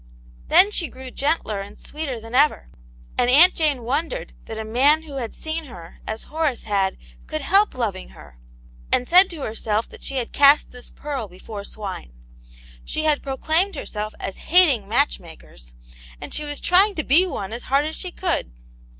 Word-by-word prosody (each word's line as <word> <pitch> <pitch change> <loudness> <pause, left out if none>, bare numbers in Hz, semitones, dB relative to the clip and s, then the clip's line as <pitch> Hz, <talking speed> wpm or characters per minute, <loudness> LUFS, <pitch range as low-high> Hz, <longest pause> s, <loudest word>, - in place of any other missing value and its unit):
Then 400 +3 +5
she 345 -5 -1
grew 260 0 -10
gentler 270 -9 -1
and 200 - -10
sweeter 290 -6 -5
than 225 +1 -11
ever, 290 +4 +3 0.5
and 245 - +3
Aunt 315 +8 +7
Jane 295 -6 0
wondered 315 - -3
that 220 - -7
a 220 - -4
man 280 +8 +3
who 290 -3 -8
had 235 -4 -5
seen 315 0 -5
her, 175 - -12
as 220 +1 -4
Horace 305 -5 -2
had, 195 -3 0 0.3
could 155 - -4
help 395 -1 +3
loving 210 -7 -3
her; 70 -5 -16 0.5
and 250 - +2
said 365 +2 +7
to 320 -5 -7
herself 220 0 -2
that - - -14
she 275 - -4
had 250 -3 -3
cast 285 +1 +5
this 250 0 -10
pearl 275 -7 -5
before 200 +3 -9
swine. 195 - -7 0.7
She 310 - -2
had 305 -2 +2
proclaimed 320 +7 0
herself 215 -6 -5
as 195 - -5
hating 305 - +5
match - - +2
makers, - - -15 0.4
and - - -8
she 300 - -1
was 290 0 -3
trying 390 +3 +3
to 310 - -2
be 330 +9 +4
one 205 - -5
as 235 - -7
hard 275 +2 +3
as 315 +1 -4
she 365 - -6
could. 350 - -2
270 Hz, 185 wpm, -22 LUFS, 215-315 Hz, 0.7 s, Aunt